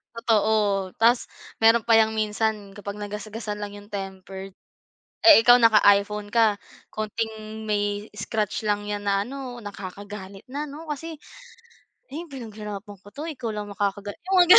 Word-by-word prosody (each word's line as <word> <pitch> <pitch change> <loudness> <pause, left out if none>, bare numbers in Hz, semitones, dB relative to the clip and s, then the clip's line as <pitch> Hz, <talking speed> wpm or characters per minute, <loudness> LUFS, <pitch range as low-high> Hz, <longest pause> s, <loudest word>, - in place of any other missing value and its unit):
Totoo. 210 -4 +2
Tas 235 +2 +4 0.3
meron 225 +1 +6
pa 230 - +4
yang 220 0 +4
minsan 215 -1 -1
kapag 205 0 -7
nagasgasan 210 +1 -5
lang 205 0 -5
yung 205 +1 -13
tempered. 195 0 -6 0.7
Eh, 305 -9 +9
ikaw 245 +1 +8
naka-iPhone 210 -2 +4
ka 225 -3 +4 0.4
konting 220 0 -4
may 205 0 -1
scratch 210 +1 -2
lang 205 0 0
yan 205 0 -3
na 200 0 +2
ano, 260 -2 -6
nakakagalit 200 0 -8
na, 290 +3 -3
no? 310 +3 -9
Kasi, 320 +2 -4 1.0
"Eh, 325 +5 -5
pinaghirapan 210 -5 -7
ko 205 - -14
to. 285 - -6
Ikaw 255 -7 -4
lang 205 -1 -5
makakaga" 205 0 -2 0.2
yung 385 - 0
mga 365 - +10
210 Hz, 145 wpm, -25 LUFS, 205-230 Hz, 1.0 s, mga